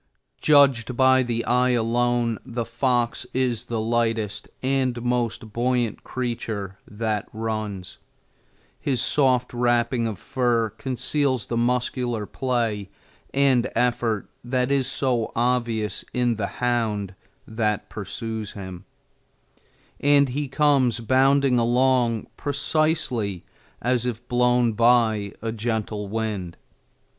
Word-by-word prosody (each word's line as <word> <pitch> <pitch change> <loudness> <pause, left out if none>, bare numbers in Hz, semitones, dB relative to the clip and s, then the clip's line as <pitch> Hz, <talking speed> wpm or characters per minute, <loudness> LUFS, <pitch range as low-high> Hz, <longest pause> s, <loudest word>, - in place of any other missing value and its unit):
Judged 135 -5 +4
by 130 0 +5
the 120 -2 -2
eye 125 +1 +3
alone, 120 0 +1
the 120 -1 -4
fox 120 0 0
is 125 -4 0
the 115 -1 -3
lightest 110 -2 -1
and 130 -2 +1
most 120 -3 -1
buoyant 120 -2 0
creature 110 -6 -4
that 105 -1 -2
runs. 110 -4 -4 0.8
His 135 -4 -1
soft 130 -2 +2
wrapping 120 -1 +1
of 110 -3 -4
fur 115 0 0
conceals 130 +1 -1
the 115 - -3
muscular 120 -2 0
play 115 -6 -2 0.4
and 135 -3 +3
effort 115 -3 0 0.2
that 125 +1 0
is 135 -2 +2
so 125 -4 0
obvious 115 -4 0
in 125 -1 +2
the 105 -3 -2
hound 110 -5 0 0.3
that 110 -2 -1
pursues 110 -2 -5
him, 95 -2 -8 1.1
and 140 -1 +4
he 145 +3 -2
comes 135 -4 +2
bounding 130 +2 +3
along 120 -1 +2
precisely 140 - 0 0.4
as 125 0 +2
if 120 0 -5
blown 125 -1 +3
by 110 -3 +3
a 115 - -1
gentle 110 -2 -3
wind. 105 -5 -3
120 Hz, 110 wpm, -24 LUFS, 110-125 Hz, 1.1 s, by